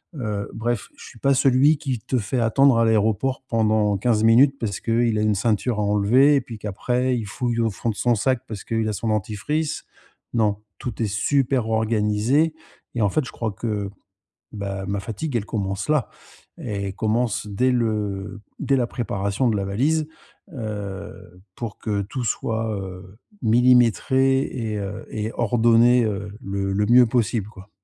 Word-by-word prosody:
Heu, 105 -6 -3
bref 120 0 -2
je - - -12
suis 115 - -14
pas 140 0 +3
celui 135 +4 +4
qui 135 -6 -3
te 130 +4 -2
fait 120 +4 -1
attendre 120 +2 +4
à 115 - +4
l'aéroport 110 +5 +1
pendant 110 -3 +2
15 110 +1 +1
minutes 130 +5 +6
parce 100 -4 -3
qu'il 115 -1 +1
a - - +1
une 105 -1 +2
ceinture 110 +2 0
à - - +1
enlever 110 +8 +4
et 135 - +2
puis 115 -3 -9
qu'après 125 +5 -1
il 110 - -4
fouille 120 +3 -2
au 115 -1 +2
fond 115 +3 -3
de - - -8
son 120 -1 +2
sac 130 +3 0
parce 105 -3 -7
qu'il 115 -1 -1
a - - -1
son 110 +3 -3
dentifrice. 110 +9 -2 0.5
Non, 105 -2 +1 0.2
tout 120 -2 -4
est - - +2
super 125 +2 +1
organisé 110 +7 +1 0.4
et 115 - 0
en 100 - +3
fait 155 +4 0
je - - -8
crois 110 -2 -3
que, 105 -1 -3 0.6
bah, 100 -2 -5
ma 100 0 -2
fatigue 115 +7 -5
elle 105 -3 0
commence 100 +3 -3
là. 150 -5 +2 0.5
Elle 100 -2 -4
commence 110 0 0
dès 125 +6 +1
le 105 -4 -2 0.2
dès 140 - +1
la 125 -3 +1
préparation 100 0 -1
de 110 - +1
la 100 - -1
valise, 150 +10 0 0.5
heu, 100 - -7
pour 115 -3 -6
que 105 -2 -1
tout 120 +5 -5
soit, 110 -1 -1
heu, 95 +1 -9 0.3
millimétré 125 +3 +4
et 110 -4 -4
heu, 100 +1 -6
et 110 +1 -3
ordonné, 120 +1 +4
heu, 105 -1 -3
le 95 -1 -2
le 105 +1 +1
mieux 125 +1 +7
possible 115 -3 0
quoi. 100 -1 -14
110 Hz, 175 wpm, -23 LUFS, 105-125 Hz, 0.6 s, mieux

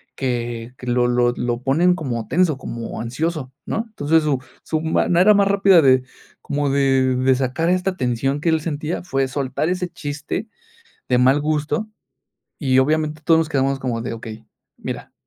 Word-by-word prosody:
que 120 -2 -3
que 125 - -10
lo 120 0 +2
lo 120 0 +2
lo 120 0 -2
ponen 170 +7 +3
como 120 - -4
tenso, 165 0 +2
como 115 -3 -6
ansioso, 135 +3 -3
¿no? 225 +1 -2
Entonces 160 -6 +1
su 145 -4 +1 0.2
su 155 -1 -2
manera 175 +5 +3
más 200 -1 +3
rápida 195 -3 +5
de 130 -3 +4 0.4
como 145 0 -1
de 135 -2 +2
de 130 +1 +3
sacar 130 +6 -1
esta 185 +1 0
tensión 135 +1 -1
que 165 - +1
él 160 - +2
sentía 155 +2 -3
fue 135 -6 0
soltar 140 +4 -2
ese 180 0 -1
chiste 150 +6 -5 0.6
de 125 - +3
mal 130 +3 +4
gusto 155 +8 -1 0.7
y 130 -4 +2
obviamente 155 +2 +1
todos 165 -1 +5
nos 160 -1 0
quedamos 135 -2 0
como 120 -3 -2
de 120 - -4
okey, 110 -1 -8 0.3
mira, - - -7
140 Hz, 170 wpm, -21 LUFS, 125-165 Hz, 0.7 s, rápida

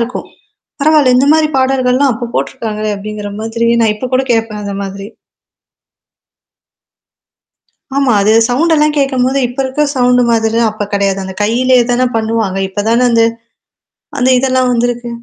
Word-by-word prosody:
இருக்கும். 235 +2 -4 0.5
"பரவால்ல! 295 -4 +3
இந்த 265 - +3
மாரி 315 -1 +2
பாடல்கள்லாம் 260 0 +1
அப்ப 235 +1 -6
போட்டுருக்காங்களே." 215 -4 -3
அப்படிங்கிற 210 0 -6
மாதிரி 230 +1 -2
நான் 220 -2 +2
இப்ப 255 - -5
கூட 265 - +1
கேட்பேன் 225 -2 -2
அந்த 200 - -4
மாதிரி. 195 0 -7 2.9
ஆமா. 275 -3 +2
அது 210 +2 +2 0.2
சவுண்டெல்லாம் 300 +3 +1
கேட்கும்போது 270 -1 +1
இப்ப 245 +3 -9
இருக்க 265 +3 -1
சவுண்டு 250 -1 +3
மாதிரிலாம் 225 0 +1
அப்ப 210 -1 -5
கிடையாது. 200 -1 0
அந்த 190 0 -7
கையிலேயே 250 +3 +2
தானே 250 +1 +1
பண்ணுவாங்க. 220 -3 -1
இப்ப 205 +2 -3
தானே 235 +2 +2
அந்த 230 -1 +3 0.9
அந்த 255 -1 +2
இதெல்லாம் 255 0 +1
வந்திருக்கு. 240 0 -1
240 Hz, 140 wpm, -13 LUFS, 215-260 Hz, 2.9 s, பரவால்ல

